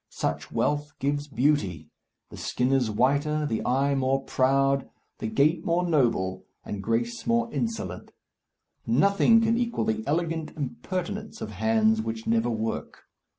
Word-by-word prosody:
Such - - -3
wealth 145 0 0
gives 145 +1 -1
beauty. 115 - 0 0.4
The - - -9
skin 125 +1 -1
is 130 -4 +2
whiter, 145 +7 +1
the 115 -6 -2
eye 135 +3 +2
more 135 0 +1
proud, 135 +1 +2 0.3
the - - -3
gait 140 +9 +2
more 175 +1 +1
noble, 115 - +1 0.2
and 105 -1 -5
grace 120 - -2
more 235 0 +1
insolent. 225 -1 -3 0.8
Nothing 200 - +4
can 230 +1 +2
equal 235 -2 -1
the 220 0 -1
elegant 165 0 -1
impertinence 185 +9 -4
of 110 - -5
hands 110 +1 +2
which 110 0 -5
never 115 +1 +2
work. 110 -1 -4
140 Hz, 140 wpm, -26 LUFS, 115-170 Hz, 0.8 s, Nothing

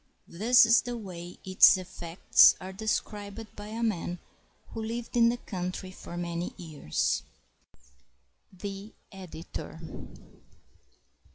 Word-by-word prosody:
This 225 +6 +5
is 230 +1 +5
the 245 0 -5
way 180 -5 -8
its 190 +1 +7
effects 175 -1 +4
are 190 +1 -8
described 210 +1 -4
by 205 0 -8
a 225 +2 -4
man 180 -5 -1 0.5
who 225 - -6
lived 230 +2 -5
in 230 -1 +6
the 240 - -1
country 185 -3 -5
for 175 -2 -9
many 175 0 -4
years. 155 - -1 1.3
The 195 +2 -7 0.2
Editor. 175 -3 -8
195 Hz, 110 wpm, -29 LUFS, 175-225 Hz, 1.3 s, its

